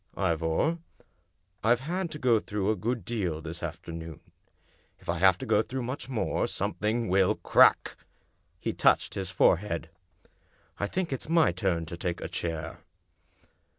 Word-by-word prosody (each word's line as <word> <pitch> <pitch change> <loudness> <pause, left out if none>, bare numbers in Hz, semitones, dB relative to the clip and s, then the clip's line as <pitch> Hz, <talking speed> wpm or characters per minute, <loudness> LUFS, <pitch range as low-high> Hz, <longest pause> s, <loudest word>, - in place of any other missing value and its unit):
Ivor, 85 - +1 0.8
I've 120 +2 +3
had 175 +5 -2
to 150 - -6
go 125 -6 +3
through 105 0 -1
a - - 0
good 115 +1 -2
deal 95 -9 -2
this 80 +1 -7
after 85 +1 -6
noon. 80 -1 -7 0.8
If - - -20
I 85 0 0
have 95 0 +5
to - - -6
go 105 - +3
through 130 +2 -4
much 130 +2 -5
more, 125 -5 0
something 110 +2 -1
will 95 0 +3
crack!" - - +4 0.6
He - - -2
touched - - +3
his 95 -2 -3
forehead. 90 -2 +1 0.4
" - - -35
I 100 - 0
think 175 - -2
it's 135 - -5
my 165 - +4
turn 85 -2 -1
to 85 +1 -7
take 85 0 -3
a - - -4
chair." 80 -3 -4
95 Hz, 160 wpm, -28 LUFS, 85-120 Hz, 0.8 s, have